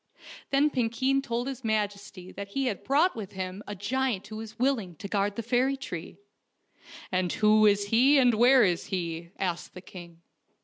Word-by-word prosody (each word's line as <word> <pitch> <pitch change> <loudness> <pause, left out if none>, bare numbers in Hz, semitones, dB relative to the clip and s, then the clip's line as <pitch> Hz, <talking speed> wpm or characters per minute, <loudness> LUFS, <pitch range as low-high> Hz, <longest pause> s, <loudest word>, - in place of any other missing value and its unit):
Then 285 +2 +3
Piiikeen 260 +2 0
told 240 -2 -3
his 265 -1 -6
majesty 205 -4 -3
that 200 0 -7
he 270 +7 -2
had 215 -7 -3
brought 305 +7 +2
with 210 -3 -7
him 185 +1 -5
a 205 - -5
giant 235 +1 -1
who 215 - -8
was 220 0 -9
willing 235 -9 0
to 200 - -8
guard 200 0 -1
the 230 - -4
fairy 255 +4 +1
tree. 175 -11 -7 0.9
"And 185 -2 0
who 215 0 +4
is 200 0 +2
he 260 +6 +5
and 250 -3 +5
where 245 +3 +6
is 175 -3 0
he? 170 -3 -4
" - - -40
asked 180 -2 -3
the 180 - -8
king. 170 -2 -12
215 Hz, 185 wpm, -27 LUFS, 190-255 Hz, 0.9 s, where